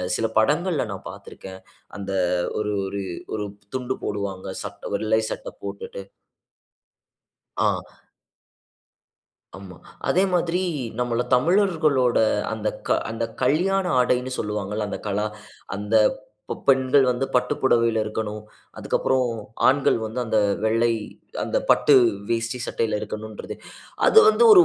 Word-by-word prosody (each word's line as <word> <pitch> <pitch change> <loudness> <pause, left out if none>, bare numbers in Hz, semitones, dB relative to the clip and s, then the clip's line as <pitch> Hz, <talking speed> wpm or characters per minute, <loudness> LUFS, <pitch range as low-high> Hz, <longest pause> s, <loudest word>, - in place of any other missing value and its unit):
சில 115 - 0
படங்கள்ல 155 +9 +2
நான் - - -8
பார்த்திருக்கேன். 95 0 -11 0.4
அந்த 100 -1 -5 0.5
ஒரு 105 0 -1 0.2
ஒரு 100 +1 -4 0.3
ஒரு 105 -1 -3 0.3
துண்டு 130 0 -2
போடுவாங்க, 100 -2 -4 0.2
சட்ட - - -7
வெள்ளை 110 0 +1
சட்ட - - -5
போட்டுட்டு. 100 0 -6 1.5
ஆ. - - +1 1.7
ஆமா. 95 -2 -11 0.3
அதே 185 - +4
மாதிரி 175 0 +1 0.4
நம்மள 120 -1 0
தமிழர்களோட 155 -4 +3 0.3
அந்தக்க - - -1
அந்தக்கல்யாண 140 +12 0
ஆடைன்னு 125 +1 +1
சொல்வாங்கள்ல. 105 0 -2
அந்த - - -4
கலா 105 +1 0 0.5
அந்த 105 +2 -2 0.5
ப - - -2
பெண்கள் 135 0 +5
வந்து 125 +2 -1
பட்டு 125 0 +2
புடவைல 115 -3 +3
இருக்கணும். 105 0 -4 0.4
அதற்கப்புறம் 130 -1 +1 0.4
ஆண்கள் 135 -1 +3
வந்து 110 +3 -4
அந்த 110 -1 +1 0.3
வெள்ளை 115 +2 +3 0.5
அந்த - - 0
பட்டு 145 - +4 0.4
வேஷ்டி 115 +2 -1
சட்டைல 110 -2 -1
இருக்கணும்ன்றது. 110 0 -6 0.5
அது 445 - +8
வந்து 465 - +3
ஒரு, 365 -3 +9
115 Hz, 110 wpm, -24 LUFS, 105-135 Hz, 1.7 s, ஒரு